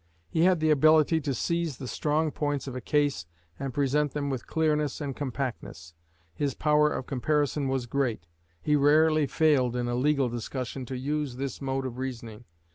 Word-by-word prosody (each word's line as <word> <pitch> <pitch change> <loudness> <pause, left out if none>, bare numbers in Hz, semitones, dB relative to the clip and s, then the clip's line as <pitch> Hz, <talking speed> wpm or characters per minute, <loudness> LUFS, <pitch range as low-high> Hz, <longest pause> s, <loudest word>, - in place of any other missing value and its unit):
He 160 - +2
had 185 -2 +4
the 155 0 +3
ability 155 +2 +4
to 140 -2 -2
seize 170 +1 -1
the 130 - -7
strong 155 +4 0
points 145 -2 -2
of 135 -2 -6
a 130 - -4
case 145 - 0 0.3
and 135 -1 -3
present 145 +2 +1
them 145 -1 -2
with 130 -3 -5
clearness 150 -3 0
and 140 -3 -4
compactness. 125 - -5 0.4
His 140 - -2
power 150 0 +3
of 130 - -4
comparison 145 +2 0
was 130 -2 -1
great. 120 -8 -1 0.4
He 150 - +2
rarely 155 +1 +4
failed 135 -7 +2
in 120 -1 -1
a 120 - -1
legal 140 +1 +2
discussion 125 +2 -5
to 130 - -4
use 145 0 -2
this 135 +2 -5
mode 135 0 -2
of 125 -1 -5
reasoning. 120 -3 -6
140 Hz, 180 wpm, -27 LUFS, 130-150 Hz, 0.4 s, had